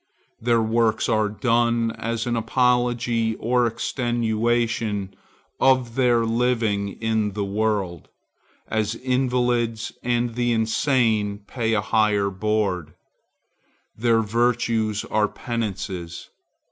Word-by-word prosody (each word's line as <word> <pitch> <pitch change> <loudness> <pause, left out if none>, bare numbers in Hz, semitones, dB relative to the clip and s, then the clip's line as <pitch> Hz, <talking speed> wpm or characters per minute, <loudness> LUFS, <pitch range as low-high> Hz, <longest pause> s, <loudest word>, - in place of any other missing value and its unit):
Their 115 0 +2
works 115 0 +1
are 110 -1 +2
done 115 0 +1
as 115 0 -3
an 120 -1 -1
apology 120 -1 +1
or 120 +2 +1
extenuation 115 -3 -1 0.5
of 130 -3 +3
their 120 -2 +3
living 115 -4 0
in 110 -2 0
the 100 0 -2
world,—as 105 +1 -3
invalids 125 -3 0
and 120 -1 0
the 120 0 0
insane 110 -3 +1
pay 115 0 -1
a 105 - +1
high 110 -1 +2
board. 95 -5 -1 1.0
Their 115 0 +2
virtues 115 -1 0
are 105 -1 +1
penances. 95 -8 -5
115 Hz, 95 wpm, -23 LUFS, 105-120 Hz, 1.0 s, of